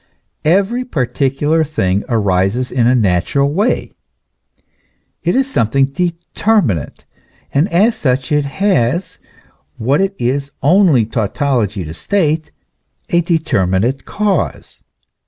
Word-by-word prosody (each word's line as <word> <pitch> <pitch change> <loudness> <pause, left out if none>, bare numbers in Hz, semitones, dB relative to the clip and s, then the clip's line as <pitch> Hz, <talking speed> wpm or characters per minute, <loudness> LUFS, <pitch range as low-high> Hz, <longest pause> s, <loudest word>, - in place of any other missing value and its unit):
Every 200 +9 +2
particular 145 - 0
thing 100 -10 -1
arises 105 +2 0
in 120 -2 +2
a 125 - +4
natural 115 - +1
way; 210 +8 0 1.3
it 175 - 0
is 270 0 +2
something 135 - +1
determinate, 170 - -1 0.5
and 150 +7 +1
as 215 +7 +3
such 130 -5 -1
it 150 -1 +2
has 170 - 0 0.6
what 135 +9 +1
it 195 0 -1
is 140 +3 -1
only 155 - +4
tautology 110 -2 -1
to 75 - -7
state 155 - -1 0.6
a 170 - +3
determinate 130 - 0
cause. 200 -6 -2
140 Hz, 105 wpm, -16 LUFS, 115-175 Hz, 1.3 s, a